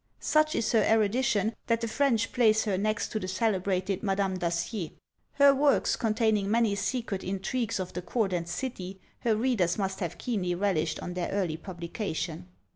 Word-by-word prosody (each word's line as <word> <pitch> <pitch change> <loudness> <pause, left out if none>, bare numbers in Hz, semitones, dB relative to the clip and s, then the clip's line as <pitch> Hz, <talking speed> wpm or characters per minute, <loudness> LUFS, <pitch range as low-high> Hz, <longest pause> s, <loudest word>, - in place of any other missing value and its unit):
Such 310 0 +2
is 230 - 0
her 225 - +4
erudition, 220 0 +2
that 230 -1 +1
the 230 - -1
French 230 -1 +1
place 220 -3 +4
her 205 -3 0
next 215 +2 -1
to 215 - -2
the 185 - -5
celebrated 190 -1 0
Madame 195 -2 0
Dacier. 170 +1 -2 0.4
Her 280 0 +6
works, 280 +1 +3
containing 215 -3 +1
many 225 -1 +3
secret 210 -2 -2
intrigues 200 +4 -2
of 185 -1 -4
the 180 - -4
court 195 +1 -1
and 170 -1 -2
city, 190 -2 -5 0.2
her 225 -2 +1
readers 215 -7 +1
must 195 -2 -2
have 175 -4 -3
keenly 185 -7 -1
relished 170 -5 0
on 180 - -5
their 180 -1 -2
early 185 -6 -1
publication." 170 -1 -5
200 Hz, 170 wpm, -28 LUFS, 185-230 Hz, 0.4 s, Her